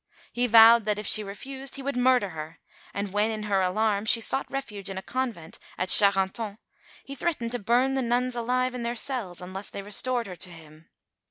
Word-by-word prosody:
He 245 +1 +1
vowed 230 0 +8
that, 210 -1 0
if 210 - -6
she 215 +2 0
refused, 265 +7 -6
he 275 - -7
would 280 0 -3
murder 250 -4 +3
her; 160 -1 -8 0.3
and 200 -1 -4
when, 210 +2 +2
in 215 -1 -4
her 200 -2 +1
alarm, 205 +2 0
she 230 - +3
sought 270 +4 -1
refuge 210 -8 -5
in 195 - -6
a 190 - -5
convent 240 -11 -4 0.2
at 185 - -1
Charenton, 200 +1 +4 0.5
he 275 - -7
threatened 275 -6 -2
to 245 - -2
burn 245 +5 +2
the 270 - 0
nuns 245 +1 0
alive 250 +2 0
in 250 - -5
their 235 +1 -2
cells 225 -8 -3
unless 190 +2 -5
they 200 - -7
restored 235 +4 -1
her 185 -3 -8
to 180 - -4
him. 160 -1 -15
220 Hz, 205 wpm, -26 LUFS, 195-250 Hz, 0.5 s, vowed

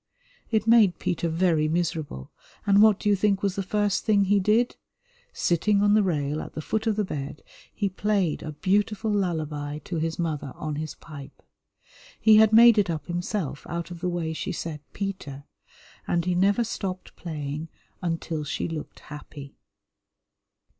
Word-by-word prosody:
It 220 -2 +1
made 225 -5 +5
Peter 170 -1 -1
very 165 -2 +2
miserable, 160 - -2 0.3
and 200 0 +5
what 215 -2 +6
do - - -3
you 205 - +5
think 200 0 +1
was 195 -2 0
the 200 - -1
first 205 0 0
thing 205 -2 +3
he 200 +1 +3
did? 215 +5 +2 0.6
Sitting 200 +4 +1
on 205 0 +4
the 215 - +5
rail 150 -5 -1
at - - -9
the 155 - -4
foot 220 +8 -2
of 220 - +2
the 210 - +1
bed, 145 -3 -6 0.3
he 205 - -1
played 195 -3 0
a 155 - -5
beautiful 210 +6 0
lullaby 155 -7 -2
to 175 - -3
his 160 +1 -2
mother 155 -5 -3
on 155 -1 -4
his 155 0 -5
pipe. 145 -3 -12 0.8
He 215 -1 +6
had 220 0 +6
made 230 0 +8
it 195 - +1
up 155 -4 -3
himself 175 -4 -3
out 170 +1 -4
of 175 - -7
the 180 - 0
way 170 -2 -2
she 160 - -4
said 165 -3 -5
"Peter," 185 -9 -5 0.6
and 170 -1 0
he 180 - +1
never 200 +6 +3
stopped 190 -4 -5
playing 150 -1 -5 0.3
until 165 -2 -2
she 145 - -3
looked 160 -3 -7
happy. 145 -1 -10
175 Hz, 170 wpm, -26 LUFS, 155-205 Hz, 0.8 s, made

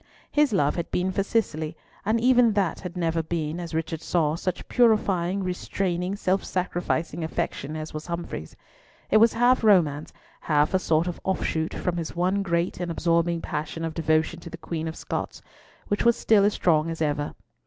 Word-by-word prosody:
His 295 -3 +3
love 150 -7 +2
had 170 - -3
been 185 +1 0
for 195 - 0
Cicely, 165 -7 -1 0.3
and 220 +3 +1
even 245 -2 +5
that 195 -4 0
had 180 -1 -7
never 165 -1 0
been, 160 0 -3
as 170 -2 -5
Richard 160 0 -2
saw, 155 -4 +1
such 180 +1 -4
purifying, 200 -6 +2
restraining, 180 0 -2
self 190 -1 0
sacrificing 175 -2 -2
affection 160 -2 -3
as 155 0 -6
was 155 +2 -6
Humfrey's. 170 - -5 0.6
It 215 - +6
was 225 +1 +5
half 245 +1 +3
romance, 160 -9 +3 0.3
half 150 +1 +1
a 190 - +4
sort 160 -2 +2
of 175 -1 -5
offshoot 165 -4 -1
from 180 -1 -2
his 165 -2 -4
one 185 +3 +1
great 170 -2 -1
and 175 -1 -3
absorbing 170 0 +1
passion 155 +2 -4
of 165 - -3
devotion 160 +1 +1
to 170 - -9
the 170 - -8
Queen 165 -1 -4
of 160 - -5
Scots, - - -4 0.5
which 205 - 0
was 235 -1 +4
still 205 -3 +4
as 205 - +2
strong 160 -2 +2
as 165 - -5
ever. 145 -2 -1
170 Hz, 185 wpm, -25 LUFS, 160-195 Hz, 0.6 s, It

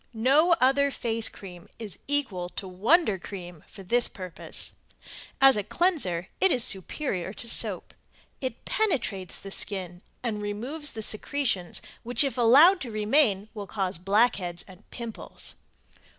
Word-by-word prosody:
No 280 +10 +4
other 275 +2 +4
face 230 -4 +1
cream 185 0 -12
is 215 -5 -3
equal 235 -12 -1
to 195 - -4
Wonder 210 - +2
Cream 175 -4 -9
for 195 - -12
this 240 +6 +2
purpose. 185 -3 -3 0.7
As 270 0 +7
a 210 - -1
cleanser 205 - 0
it 380 - +4
is 245 -5 +3
superior 190 - -2
to 235 - -6
soap. - - +1 0.5
It 255 -3 -5
penetrates 240 - -1
the 195 - -10
skin 180 -3 -4 0.2
and 215 -4 -2
removes 250 +9 -3
the 220 - -4
secretions 215 -5 0 0.2
which 245 +5 +3
if 270 -4 -1
allowed 285 +11 +6
to 250 - -5
remain 215 -1 +2
will 205 -3 -7
cause 185 -3 -2
blackheads 195 -3 +1
and 190 +2 -16
pimples. 235 -2 -6
220 Hz, 140 wpm, -27 LUFS, 190-270 Hz, 0.7 s, As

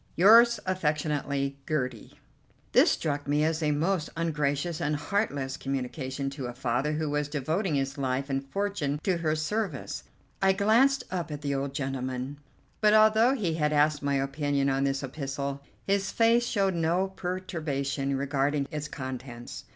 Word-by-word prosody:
"Yours 230 +5 +7
affectionately, 150 -5 -1
"GERTIE." 125 -7 -3 0.5
This - - +6
struck 145 -2 -1
me 145 +1 +2
as 160 +1 0
a 155 - +1
most 160 +3 0
ungracious 155 0 -1
and 150 -2 0
heartless 145 -6 -1
communication 135 +1 -3
to 135 -2 -5
a 120 - -6
father 130 +4 0
who 155 0 -1
was 150 0 -1
devoting 155 +5 -1
his 135 +1 -2
life 135 0 -1
and 135 -1 -1
fortune 175 -6 -1
to 185 -3 +1
her 160 -2 0
service. 160 - -3 0.4
I 190 0 +5
glanced 235 +7 +3
up 175 -3 -3
at 145 -1 -5
the 140 -1 -1
old 135 0 -3
gentleman; 130 0 -3 0.4
but, 215 0 +5
although 220 +4 +5
he 190 -10 -1
had 150 -2 +1
asked 150 0 +3
my 140 -1 0
opinion 140 0 0
on 135 +1 +1
this 135 0 -1
epistle, 140 0 -4 0.2
his 195 -1 +1
face 235 +1 +3
showed 195 -4 +1
no 170 +3 +1
perturbation 155 -7 -2
regarding 140 +1 0
its 150 0 -4
contents. 130 -3 -7
150 Hz, 155 wpm, -28 LUFS, 135-180 Hz, 0.5 s, Yours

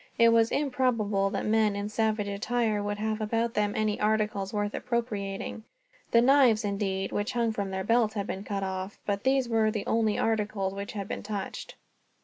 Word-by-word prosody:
It 230 0 +6
was 230 0 +4
improbable 230 -8 +1
that 200 -1 -3
men 215 -1 +2
in 200 0 -3
savage 215 -1 0
attire 215 +1 0
could 205 0 -2
have 215 +1 -2
about 230 +2 0
them 205 -1 +1
any 215 -1 0
articles 210 -2 0
worth 205 -1 -1
appropriating. 220 -4 -3 0.5
The 235 0 +5
knives, 250 -5 +5
indeed, 195 -1 -1
which 205 0 -2
hung 235 -2 +1
from 200 -2 -3
their 190 0 -3
belts 230 0 +2
had 200 -2 -2
been 195 0 -5
cut 200 -1 -3
off; 190 +1 -4
but 200 -1 -1
these 265 -1 +3
were 225 -2 +2
the 215 -2 -3
only 220 -2 +1
articles 210 -3 0
which 200 0 -6
had 200 -2 -4
been - - -4
touched. 205 -2 -5
215 Hz, 185 wpm, -28 LUFS, 200-225 Hz, 0.5 s, It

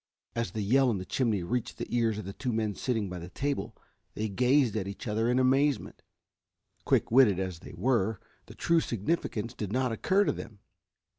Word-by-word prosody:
As 115 0 -1
the 110 -2 -2
yell 130 +6 +4
in 110 - 0
the 95 - -5
chimney 110 -7 0
reached 120 +6 -2
the - - -3
ears 115 -3 +2
of 105 - -5
the 100 - -6
two 125 +3 -3
men 110 -2 0
sitting 110 -1 -1
by 90 -1 -6
the 85 +1 -8
table 140 +7 -3 0.4
they 110 0 -2
gazed 125 +3 +3
at 100 -3 -2
each 100 +4 -7
other 110 +2 +1
in 125 - +2
amazement. 135 0 +2 0.8
Quick - - +2
witted 115 -6 +6
as 95 -3 -3
they 90 - -11
were, 110 0 +1 0.3
the - - -12
true 170 0 +3
significance 115 - -2
did 105 -3 -5
not 130 +1 +1
occur 190 - +2
to - - +1
them. 110 - -8
115 Hz, 200 wpm, -29 LUFS, 100-130 Hz, 0.8 s, witted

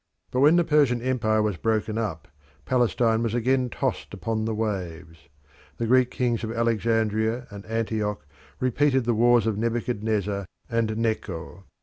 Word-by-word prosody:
But 125 - 0
when 150 +5 +6
the 175 - +4
Persian 145 -6 +3
empire 110 -4 +1
was 105 -5 -1
broken 110 0 0
up 100 -9 -3 0.4
Palestine 120 -2 +2
was 115 -1 -1
again 125 +1 +1
tossed - - -3
upon 110 -1 -2
the 110 -1 -1
waves. 85 -8 -5 0.5
The 115 - -1
Greek 125 +1 +4
kings 120 -3 -1
of 110 - -3
Alexandria 115 0 0
and 100 -1 -9
Antioch 110 -6 -2 0.3
repeated 130 +1 +2
the 120 - +2
wars 120 +1 +4
of 110 -2 -1
Nebuchadnezzar 110 -4 -1 0.2
and 115 -1 0
Necho. 95 -6 -3
115 Hz, 145 wpm, -25 LUFS, 105-120 Hz, 0.5 s, when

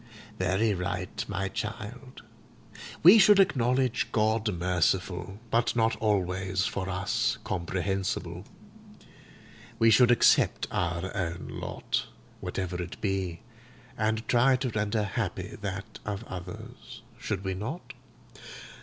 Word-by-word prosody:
"Very 95 +4 +2
right, 90 -2 -3
my 100 0 -2
child. 115 +5 -6 0.8
We 190 +7 +10
should 200 0 +7
acknowledge 125 -7 +2
God 110 0 +1
merciful, 90 +1 0
but 115 +1 +2
not 115 -1 +2
always 95 -3 0
for 95 0 -3
us 95 0 0
comprehensible. 95 +2 -2 1.3
We 115 0 +5
should 120 +3 +6
accept 120 - +4
our 90 +1 -2
own 90 -2 -3
lot, - - -3 0.3
whatever 90 -1 -3
it 85 - -7
be, 95 -3 -2 0.5
and 110 +1 -1
try 130 +2 +4
to 130 0 -1
render 105 0 0
happy 100 - -3
that 100 -1 -5
of 105 0 -4
others. 90 -3 -9 0.2
Should 95 -2 -3
we 95 -1 -1
not? 115 - -6
100 Hz, 110 wpm, -28 LUFS, 95-115 Hz, 1.3 s, We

